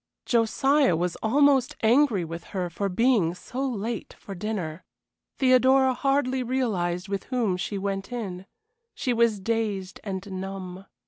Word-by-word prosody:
Josiah 260 - +3
was 175 +1 -1
almost 270 +2 +3
angry 230 -5 +4
with 165 +1 -7
her 180 -2 -2
for 200 +4 -2
being 195 -4 +2
so 250 +8 -5
late 235 -3 -3
for 200 - -9
dinner. 185 -4 -4 0.5
Theodora 260 0 +4
hardly 265 0 +1
realized 205 -8 -1
with 195 0 -3
whom 235 -8 0
she 190 +3 -3
went 195 +2 -3
in; 195 -6 -5 0.5
she 250 - -1
was 230 -3 +2
dazed 205 -3 -2
and 195 -1 -5
numb. 190 -1 -7
215 Hz, 135 wpm, -26 LUFS, 185-255 Hz, 0.5 s, angry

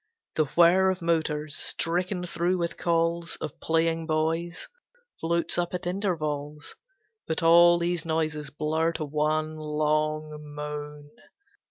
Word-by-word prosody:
The 155 - +2
whir 180 +3 +6
of 185 -2 -2
motors, 155 -3 0
stricken 180 +2 -1
through 175 +1 0
with 170 -1 -2
calls 170 0 0
Of 150 - -6
playing 165 0 0
boys, 165 +2 -1 0.5
floats 170 +1 +1
up 175 +1 -1
at 180 - -5
intervals; 155 -6 -3 0.5
But 160 +2 -2
all 170 +1 +7
these 170 -1 -1
noises 155 -3 -2
blur 160 +3 0
to 160 -2 -3
one 155 +1 -1
long 155 0 -1 0.2
moan. 150 0 -6
160 Hz, 125 wpm, -27 LUFS, 150-170 Hz, 0.5 s, all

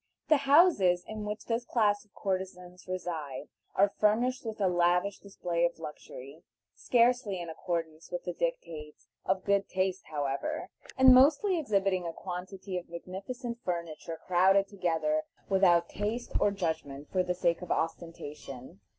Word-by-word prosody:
The 305 - +7
houses 275 - +5
in 215 -1 -5
which 210 +1 -5
this 230 +1 -1
class 210 -4 +1
of 210 - -33
courtesans 185 -2 -4
reside 160 -7 -4 0.3
are 200 +1 +4
furnished 240 +5 +2
with 220 -1 -5
a 195 - +3
lavish 180 +2 +2
display 175 -4 -2
of 170 0 +1
luxury, 150 -2 -9 0.3
scarcely 240 -5 +2
in 170 -1 -5
accordance 165 -2 -4
with - - -3
the - - -3
dictates 165 - -4 0.2
of 190 0 0
good 200 0 +2
taste 185 0 -1
however, 150 - -3 0.3
and 260 -1 +9
mostly 310 +8 +5
exhibiting 195 - +1
a 165 - -4
quantity 185 +1 -5
of 175 - -15
magnificent 215 +8 -6
furniture 170 -2 -4
crowded 190 +2 +4
together 200 - 0 0.3
without 180 -3 +4
taste 220 +4 -3
or - - +4
judgment 160 -7 -4
for 185 - +2
the 180 0 -1
sake 170 -1 +1
of 180 - -8
ostentation. 150 - -4
185 Hz, 145 wpm, -30 LUFS, 170-215 Hz, 0.3 s, and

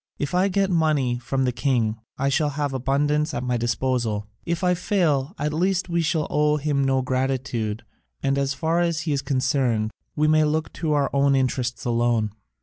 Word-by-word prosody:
If 145 +2 -3
I 185 +2 +3
get 195 0 +1
money 150 -7 +1
from 130 +2 -1
the 125 - +1
king, 120 -3 0 0.2
I 135 +1 +1
shall 150 +2 +1
have 145 -1 -2
abundance 145 +4 0
at 120 - -2
my 125 -1 0
disposal: 120 -2 -1 0.2
if 170 +1 -1
I 180 0 +4
fail, 170 -4 0
at 150 +1 -2
least 185 +3 0
we 170 0 +1
shall 155 -1 0
owe 150 0 +2
him 145 -1 0
no 135 -1 +1
gratitude, 130 -4 -2 0.4
and 135 0 +2
as 140 0 0
far 165 +1 0
as 170 -2 +1
he 155 -1 -2
is 140 - 0
concerned 130 -5 0 0.2
we 155 0 +2
may 155 0 +4
look 155 +1 -1
to 160 -3 -1
our 145 -2 +1
own 140 0 +3
interests 125 -2 -1
alone." 120 -2 +1
140 Hz, 190 wpm, -24 LUFS, 125-155 Hz, 0.4 s, I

